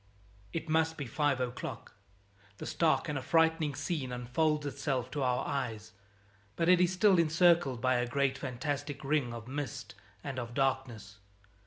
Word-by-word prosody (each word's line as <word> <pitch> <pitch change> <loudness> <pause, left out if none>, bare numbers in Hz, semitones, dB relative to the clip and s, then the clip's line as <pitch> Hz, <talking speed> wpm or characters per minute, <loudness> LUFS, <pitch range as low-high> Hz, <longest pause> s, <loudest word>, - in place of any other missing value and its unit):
It 165 0 -4
must 160 +1 +1
be 145 - -4
five 140 +2 0
o'clock. 125 -1 -5 0.6
The - - -7
stark 165 -1 +1
and 150 -3 -2
affrighting 160 +1 +2
scene 145 -7 -3
unfolds 145 +5 0
itself 135 -2 -2
to 145 - -3
our 125 -1 +1
eyes, 110 -5 -3 0.6
but 165 - 0
it 180 0 +6
is 180 0 +3
still 185 0 +4
encircled 165 -6 +3
by 130 0 +3
a 120 0 0
great 135 +1 +1
fantastic 140 +3 -4
ring 140 -3 +1
of 115 -1 -8
mist 140 -2 -5 0.3
and 135 -2 -4
of 120 -1 -6
darkness. 130 -7 -1
140 Hz, 155 wpm, -31 LUFS, 125-160 Hz, 0.6 s, it